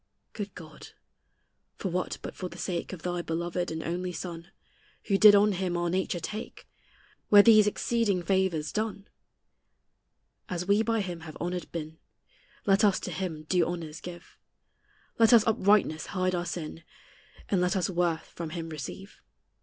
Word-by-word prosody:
Good 205 -2 -6
God, 155 -3 -12 0.8
for 190 - -3
what 180 +1 -2
but - - -6
for 185 - -5
the 170 - -11
sake 175 0 -3
Of 185 -4 -8
thy 175 -1 -2
beloved 170 +2 -2
and 160 0 -4
only 180 +2 -3
Son, 170 0 -7 0.5
Who 195 - +1
did 210 -1 +9
on 205 +1 +5
him 180 -2 -1
our 175 0 0
nature 185 -1 -1
take, 215 +7 -7 0.6
Were 205 -1 +9
these 215 -2 +7
exceeding 210 -4 0
favors 180 -5 0
done? 210 -2 -3 1.4
As 180 -2 -3
we 200 +2 +4
by 225 0 +1
him 180 -3 -5
have 160 -2 -10
honored 175 0 -4
been, 160 -1 -6 0.7
Let 195 +1 +4
us 200 -2 +4
to 180 - -5
him 165 -3 -4
due 175 +2 +2
honors 165 -3 -5
give; 175 -1 -10 0.8
Let 230 +1 +6
us 225 -2 +7
uprightness 200 -7 +2
hide 185 -1 -1
our 175 0 -2
sin, 165 -1 -5 0.7
And 190 -3 +2
let 180 +2 +1
us 185 -3 +1
worth 175 -3 0
from 170 -2 -7
him 165 0 -5
receive. 160 +6 -8
180 Hz, 160 wpm, -28 LUFS, 170-200 Hz, 1.4 s, did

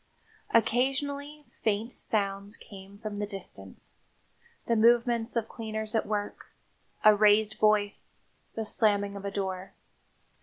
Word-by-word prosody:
Occasionally 280 +5 0 0.2
faint 220 +2 0
sounds 200 0 -2
came 195 -1 -12
from 210 -1 -6
the 205 - -2
distance 175 - -10 0.7
the 235 - +2
movements 235 +1 +3
of 230 -1 0
cleaners 220 -1 -5
at 225 - 0
work, 205 -1 -3 0.6
a 215 0 +9
raised 210 +1 +4
voice, 210 -1 +1 0.4
the 225 - -3
slamming 205 -2 +1
of 200 0 -7
a - - -1
door. 190 -1 -4
215 Hz, 120 wpm, -29 LUFS, 200-230 Hz, 0.7 s, a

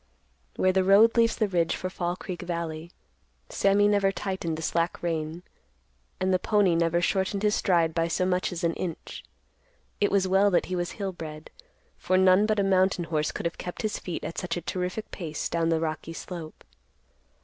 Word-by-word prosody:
Where 185 - +3
the 190 0 +3
road 200 +4 +6
leaves 230 -1 +3
the 215 - +1
ridge 175 -4 +1
for 185 - -4
Fall 175 -1 -3
Creek 180 -2 -7
Valley, 170 -2 -4 0.6
Sammy 200 +1 +3
never 200 -1 +3
tightened 190 -5 -3
the 160 - -6
slack 170 +2 -1
rein, 165 0 -3 0.8
and 185 0 +1
the 185 - +3
pony 205 -4 +2
never 170 +1 +2
shortened 190 +2 0
his 210 0 +3
stride 170 -5 +2
by 165 0 +1
so 180 +2 0
much 185 0 0
as 175 -1 -5
an 170 0 +2
inch. 170 -1 -6 0.8
It 205 - +3
was 195 -1 +2
well 195 +2 +4
that 180 - +2
he 185 - -3
was 175 -1 -2
hill 195 -2 -3
bred, 155 -3 -9 0.5
for 185 - +1
none 190 +2 +5
but 215 -1 +1
a - - +3
mountain 190 -2 +2
horse 155 -2 -1
could - - -6
have 170 - -3
kept 180 - -6
his 215 - -2
feet 175 - -5
at - - -4
such 175 -2 -3
a - - -3
terrific 180 +5 -4
pace 155 -5 -4
down 165 -1 0
the 165 -1 +2
rocky 160 0 -4
slope. 165 -2 -8
180 Hz, 195 wpm, -27 LUFS, 165-195 Hz, 0.8 s, road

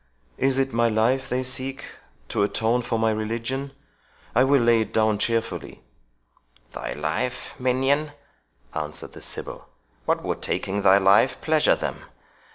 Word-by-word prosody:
Is 135 0 +2
it 135 -2 0
my 115 0 +3
life 125 +5 +1
they 130 +1 0
seek, 135 +1 -4 0.4
to - - 0
atone 115 +4 +1
for 115 -1 -2
my 110 0 +2
religion? 115 +6 -3 0.6
I 125 - +5
will 140 +1 +4
lay 115 -1 +4
it 110 0 -3
down 110 -2 +2
cheerfully." 115 -1 -2 0.9
"Thy - - -4
life, 80 - -3
minion?" 135 +4 +1 0.6
answered 75 -1 -5
the - - -11
sibyl; - - -6 0.4
"what - - +1
would - - -3
taking 100 +2 -2
thy 95 0 +6
life 100 +6 +4
pleasure 155 -1 +3
them? - - -5
120 Hz, 145 wpm, -24 LUFS, 110-135 Hz, 0.9 s, thy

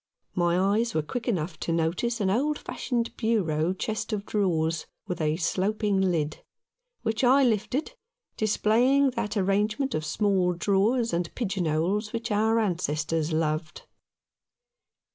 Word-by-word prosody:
My 175 -1 +2
eyes 210 +4 +1
were 155 - +1
quick 235 +9 -5
enough 170 -7 -2
to - - -2
notice 170 +9 0
an 195 -2 +1
old 290 +8 +1
fashioned 235 -2 -3
bureau 180 -8 +1
chest 215 +4 -3
of 205 -1 -2
drawers 165 -7 0 0.2
with 180 -3 -3
a 155 0 +1
sloping 200 +3 0
lid, 165 -5 -1 0.6
which 225 +1 -1
I 265 +3 +6
lifted, 250 - 0 0.4
displaying 245 +6 +3
that 210 -3 -3
arrangement 210 +7 +1
of 155 - -1
small 190 0 +1
drawers 205 +6 +1
and 170 -1 -1
pigeon 195 -7 -1
holes 185 +8 0
which 230 0 -3
our 220 +2 +2
ancestors 165 -5 0
loved. 155 +1 -1
200 Hz, 135 wpm, -27 LUFS, 170-225 Hz, 0.6 s, I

